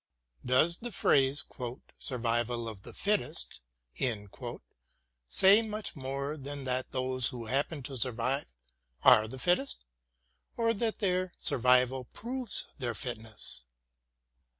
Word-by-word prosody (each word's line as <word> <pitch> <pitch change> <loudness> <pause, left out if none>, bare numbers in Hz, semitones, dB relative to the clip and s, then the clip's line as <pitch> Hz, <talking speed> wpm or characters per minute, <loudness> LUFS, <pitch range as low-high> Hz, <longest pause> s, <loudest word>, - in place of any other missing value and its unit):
Does 155 +7 +3
the 240 +1 -7
phrase 140 -6 +3 0.5
"survival 120 -1 -1
of 110 -4 -7
the - - -9
fittest" 200 - -1 1.7
say 195 - +7
much 215 -3 -5
more 140 +2 -3
than 140 0 -6
that 130 0 0
those 130 -2 +2
who 120 -4 -4
happen 140 +4 -1
to 135 +2 -5
survive 130 +3 0 0.5
are 110 0 +7
the 130 +4 -7
fittest, 180 - +1 0.7
or 230 -1 +2
that 225 0 -1
their 185 -2 0
survival 125 +1 +3
proves 245 - -2
their 120 -3 -2
fitness? 110 - -5
135 Hz, 110 wpm, -31 LUFS, 125-180 Hz, 1.7 s, say